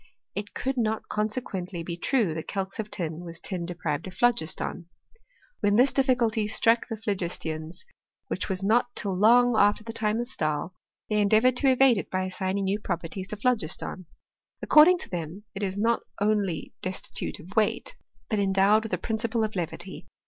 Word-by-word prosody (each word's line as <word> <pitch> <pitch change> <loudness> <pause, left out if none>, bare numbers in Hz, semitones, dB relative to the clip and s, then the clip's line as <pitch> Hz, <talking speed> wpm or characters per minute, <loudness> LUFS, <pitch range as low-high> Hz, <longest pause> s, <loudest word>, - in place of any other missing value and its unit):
It 205 0 -6
could 265 0 -2
not 220 -2 -1
consequently 200 -5 -3
be 170 0 -4
true 200 - +1
that 160 0 -6
calx 195 0 -4
of 215 -1 -3
tin 165 -5 -4
was 170 -1 -8
tin 180 -4 -4
deprived 170 -2 -3
of 180 - -9
phlogiston. 180 -6 0 0.7
When 205 0 +2
this 255 +4 +5
difficulty 240 -5 +2
struck 230 +2 +3
the 225 - -4
phlogistians, 175 - -4 0.4
which - - -3
was 190 0 -1
not 240 +4 +2
till 195 -3 -2
long 240 +4 +5
after 205 0 +3
the 225 +1 -6
time 220 0 0
of 240 - -1
Stahl, 155 - -2 0.3
they 210 -1 +2
endea 215 +2 +4
voured 255 -1 +4
to 270 -1 +4
evade 255 -4 +5
it - - -6
by 185 0 -1
assigning 185 +1 -2
new 195 +2 0
properties 175 0 -4
to 210 - -5
phlogiston. 200 -6 -1 0.5
According 325 +4 +7
to - - -7
them 175 +3 -5
it 200 - -6
is 195 -1 -2
not 230 +3 +2 0.2
only 205 -5 0
desti 185 +1 -4
tute - - -4
of 185 +5 -12
weight, 220 - +1 0.3
but 215 - 0
endowed 195 +2 +4
with 220 -3 -6
a - - +2
principle 225 +3 -1
of 215 -1 -3
levity. 175 +1 -4
205 Hz, 180 wpm, -27 LUFS, 185-225 Hz, 0.7 s, According